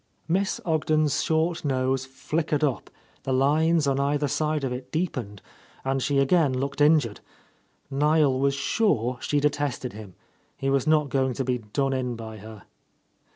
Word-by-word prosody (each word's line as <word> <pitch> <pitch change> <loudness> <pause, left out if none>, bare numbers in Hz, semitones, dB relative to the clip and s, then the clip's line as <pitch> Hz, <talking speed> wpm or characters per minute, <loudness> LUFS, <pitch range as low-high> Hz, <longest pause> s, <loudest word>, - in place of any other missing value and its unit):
Miss 190 +4 0
Ogden's 155 -2 +1
short 160 +1 0
nose 130 -1 0
flickered 150 +3 -2
up, 140 -5 -1 0.3
the 135 - -4
lines 150 +4 +3
on 135 -1 +1
either 145 +1 +1
side 155 +1 -1
of 130 -2 -1
it 125 +1 -8
deepened, 130 - -3 0.4
and 135 0 0
she 140 +2 0
again 140 +1 +3
looked 140 +2 -3
injured. 145 -8 +3 0.7
Niel 145 -1 +3
was 140 0 +2
sure 130 - 0
she 145 - 0
detested 145 -3 -1
him. 105 -3 -10 0.4
He 135 0 -1
was 135 0 +1
not 155 -2 +3
going 130 -2 +1
to 135 - -1
be 125 -1 -1
done 135 +5 -1
in 125 -2 -2
by 110 -1 -8
her. 110 0 -11
140 Hz, 155 wpm, -25 LUFS, 130-155 Hz, 0.7 s, lines